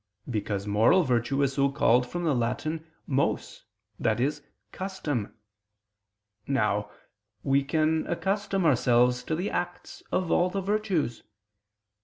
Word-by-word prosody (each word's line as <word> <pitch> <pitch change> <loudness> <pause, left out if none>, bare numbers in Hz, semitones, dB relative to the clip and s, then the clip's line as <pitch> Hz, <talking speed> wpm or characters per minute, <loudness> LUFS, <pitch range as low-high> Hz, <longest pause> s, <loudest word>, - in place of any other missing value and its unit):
Because 105 -4 -2
moral 110 - +4
virtue 130 +1 +1
is 140 -1 +1
so 140 0 +2
called 125 -3 +3
from 175 0 -3
the 160 -3 +2
Latin 150 +7 -2 0.2
mos, 135 0 -1 0.4
i.e. 120 +5 +2 0.4
custom. 155 - -4 1.1
Now, 105 -6 +1 0.5
we 135 0 +2
can 155 +2 +1
accustom 195 +1 -1
ourselves 125 -3 +3
to 160 - -1
the 180 +5 -2
acts 175 0 -4
of 185 -2 0
all 180 +1 +3
the 195 - -2
virtues. 195 - -1
140 Hz, 120 wpm, -27 LUFS, 120-175 Hz, 1.1 s, moral